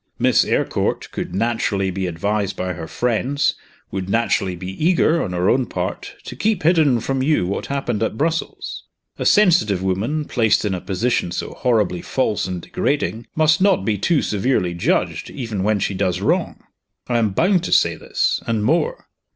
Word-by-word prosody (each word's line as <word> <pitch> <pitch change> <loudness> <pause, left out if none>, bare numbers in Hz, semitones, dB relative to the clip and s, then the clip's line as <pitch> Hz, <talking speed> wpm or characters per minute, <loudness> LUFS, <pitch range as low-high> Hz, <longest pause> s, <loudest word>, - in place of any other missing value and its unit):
Miss - - +4
Eyrecourt - - -1
would - - -4
naturally 100 -3 0
be 95 0 -2
advised 100 +4 -1
by 90 0 -3
her 80 - -7
friends, 125 - 0 0.4
would 95 -1 -4
naturally 100 -4 +1
be 95 - -6
eager, 170 -1 +3
on - - -3
her 90 +1 0
own 130 +2 +2
part, - - -4
to - - -8
keep 210 -4 0
hidden 155 -7 +4
from 135 +3 -2
you 145 - +2
what 95 - -3
happened 135 -6 -2
at 110 -1 -1
Brussels. 160 +3 -3 0.3
A - - +1
sensitive 170 - +4
woman, 110 +12 -1
placed 110 -5 +2
in 100 - 0
a 90 - -3
position 100 -1 -1
so - - -4
horribly 105 -8 +1
false 110 -7 -1
and 90 -2 -5
degrading, 120 -5 -2
must 155 +2 +3
not 190 - +3
be 110 - +1
too 155 - +2
severely 105 -4 0
judged, 85 - -1
even 115 -8 -4
when 105 +2 +2
she 100 - -1
does 90 -1 0
wrong. - - -1 0.4
I 120 -1 +1
am 110 -2 +2
bound 180 - +2
to - - -4
say 85 -1 +4
this - - -1
and 110 -2 0
more. 170 - 0
110 Hz, 175 wpm, -20 LUFS, 95-145 Hz, 0.4 s, Miss